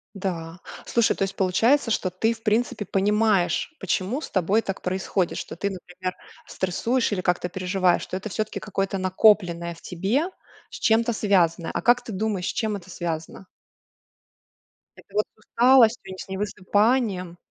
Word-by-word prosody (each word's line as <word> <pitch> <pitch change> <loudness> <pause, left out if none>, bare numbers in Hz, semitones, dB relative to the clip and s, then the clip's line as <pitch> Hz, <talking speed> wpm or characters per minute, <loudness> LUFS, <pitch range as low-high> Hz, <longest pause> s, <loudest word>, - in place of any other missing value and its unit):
Да, 175 -3 -4 0.3
слушай, 235 -1 +2
то - - -1
есть 195 - -3
получается, 230 +8 +2
что 185 -4 0
ты, 225 +6 +1
в 225 0 -16
принципе, 215 -1 0
понимаешь, 210 - +1
почему 195 - -1
с - - -7
тобой 195 +4 +2
так 195 -2 -5
происходит, 185 0 -1
что - - -7
ты, 200 +3 -2
например, 185 0 -6 0.3
стрессуешь 230 +7 -1
или 185 -3 -1
как-то 180 0 0
переживаешь, 185 0 +1
что - - -6
это 210 +3 -6
всё-таки 215 +4 -3
какое-то 195 -1 -2
накопленное 185 -3 +3
в 165 - -16
тебе, 215 - -1 0.4
с - - -10
чем-то 230 +1 +3
связанное. 175 -6 +2
А - - -1
как 240 +2 +4
ты 225 - -7
думаешь, 200 -2 -2
с - - -1
чем 215 -2 -1
это 185 -2 -9
связано? 165 +2 -5 1.5
Это - - -17
вот 210 - +3
с - - -51
усталостью, 240 +1 +4
и 190 - -8
не 185 - -8
с - - -7
невысыпанием. 200 -1 0
195 Hz, 165 wpm, -24 LUFS, 180-220 Hz, 1.5 s, как